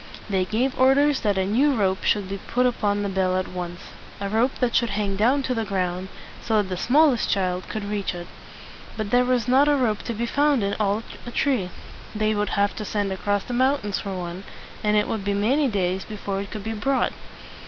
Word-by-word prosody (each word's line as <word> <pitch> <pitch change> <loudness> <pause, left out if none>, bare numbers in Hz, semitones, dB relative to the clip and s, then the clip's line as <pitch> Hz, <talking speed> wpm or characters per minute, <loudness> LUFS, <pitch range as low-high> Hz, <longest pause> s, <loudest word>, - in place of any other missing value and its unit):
They 190 -1 +2
gave 250 +7 -1
orders 275 +2 +4
that 205 -3 0
a 190 - +1
new 265 +8 +3
rope 190 -4 0
should 205 -2 +1
be 195 +1 -5
put 250 +1 +1
upon 205 -4 +1
the - - -1
bell 185 -1 +1
at 185 - -1
once, 175 -1 -6 0.4
a 200 0 -3
rope 230 +5 +1
that 245 -2 0
should 235 -2 +3
hang 200 -1 -1
down 250 +8 +2
to 260 - -1
the 225 -2 -1
ground, 185 -2 -2 0.3
so 220 -2 +1
that 200 -2 -1
the 185 - -2
smallest 270 - +3
child 185 -2 -1
could 215 -2 -4
reach 205 -3 -2
it. 175 0 -6 0.7
But 215 -2 -3
there 245 0 +5
was 250 -2 +1
not 265 +3 +5
a 295 - +4
rope 230 -6 +1
to 235 - -2
be 235 +2 -1
found 285 -1 +2
in 200 0 0
all 210 +1 +1 0.2
Atri. 240 -5 0 0.5
They 215 0 +1
would 210 0 -1
have 200 0 +2
to 215 - -3
send 205 -2 -1
across 205 +1 -1
the 245 - -6
mountains 255 -5 +1
for 195 -1 -5
one, 175 +1 -6 0.4
and 210 0 +3
it 210 - +2
would 215 -3 -3
be 200 0 0
many 260 +9 +2
days 190 -4 -1
before 200 -2 -4
it 200 - -7
could 215 - -6
be 220 +1 -3
brought. 255 +5 0
210 Hz, 220 wpm, -24 LUFS, 195-245 Hz, 0.7 s, there